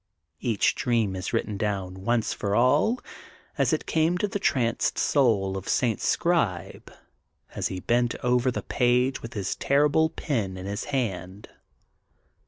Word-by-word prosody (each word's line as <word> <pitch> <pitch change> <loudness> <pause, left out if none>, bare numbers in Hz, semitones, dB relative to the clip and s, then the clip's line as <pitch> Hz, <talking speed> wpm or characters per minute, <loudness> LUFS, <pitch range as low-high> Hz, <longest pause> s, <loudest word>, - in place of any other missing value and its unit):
Each 115 -5 +1
dream 115 -6 0
is 90 0 -4
written 105 -2 -1
down 100 -3 -2
once 120 +2 0
for 100 0 -2
all 145 - +3 0.6
as - - +1
it - - -1
came, 160 +2 +1
to 210 - 0
the 205 +1 -3
tranced 120 -10 0
soul 110 -9 +2
of 95 -1 -6
St. 120 -4 +1
Scribe, 115 - 0 0.6
as - - -1
he 95 -1 -5
bent 120 +2 +1
over 125 +1 +2
the 125 - -3
page, 125 +2 +1
with 115 0 -9
his 100 -3 -2
terrible 150 +3 +2
pet 110 - -3
in 95 - -7
his 100 +1 -4
hand. 100 -8 -3
120 Hz, 150 wpm, -26 LUFS, 100-135 Hz, 0.6 s, all